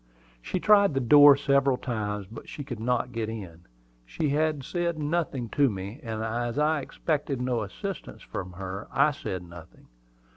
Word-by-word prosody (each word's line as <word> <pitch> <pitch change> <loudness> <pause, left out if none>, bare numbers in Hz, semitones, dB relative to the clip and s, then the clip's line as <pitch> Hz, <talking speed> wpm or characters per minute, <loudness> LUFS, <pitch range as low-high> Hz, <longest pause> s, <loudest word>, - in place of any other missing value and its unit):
She 185 - -3
tried 200 -5 +5
the - - +2
door 145 +2 +8
several 140 -2 +2
times, 105 -5 -3
but 110 +4 -11
she 145 - -6
could 125 -5 -6
not 125 +2 0
get 115 -2 -3
in. 90 -7 -8 0.4
She 140 - -2 0.3
said 170 +3 -2
nothing 150 -5 -1
to 140 +3 +3
me; 100 +4 -6
and 110 -4 -4
as 120 +2 -2
I 150 0 +2
expected 145 -2 -2
no 125 -2 0
assistance 185 - -6
from 90 0 -6
her, 95 +2 -6
I 140 +2 +4
said 95 -10 -5
nothing. 85 -1 -14
125 Hz, 160 wpm, -27 LUFS, 105-145 Hz, 0.4 s, door